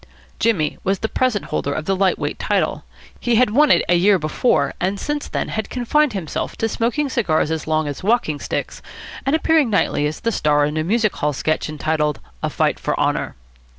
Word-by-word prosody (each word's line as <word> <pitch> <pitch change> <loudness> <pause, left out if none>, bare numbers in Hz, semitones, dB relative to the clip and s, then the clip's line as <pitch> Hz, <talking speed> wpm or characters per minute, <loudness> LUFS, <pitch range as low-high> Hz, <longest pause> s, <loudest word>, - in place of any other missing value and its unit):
Jimmy 180 -10 +1
was 195 +1 +1
the 220 - -2
present 245 -4 0
holder 140 - -2
of 155 - -4
the 195 - +1
light 190 0 +2
weight - - -4
title. - - -1 0.3
He 240 -1 +1
had 245 -1 +4
won 295 +6 +4
it - - +4
a 180 - +3
year 190 +3 +4
before, 155 - +1
and 190 +3 0
since 295 0 -3
then - - -3
had 220 - -3
confined 255 +3 +1
himself 180 -7 -4
to 225 - 0
smoking 240 +7 0
cigars 175 - 0
as 160 -1 -3
long 155 -1 +1
as 145 -2 -5
walking 190 -8 +1
sticks - - -4 0.5
and 275 - +3
appearing 320 -4 +3
nightly 195 -7 +1
as 150 - -6
the 230 - 0
star 150 -6 +2
in 150 +1 -3
a 155 - 0
music 215 +4 +1
hall 150 0 0
sketch 155 +3 -1
entitled 150 0 -1 0.2
"A - - -1
Fight - - 0
for - - -2
Honour." - - 0
195 Hz, 205 wpm, -20 LUFS, 155-235 Hz, 0.5 s, had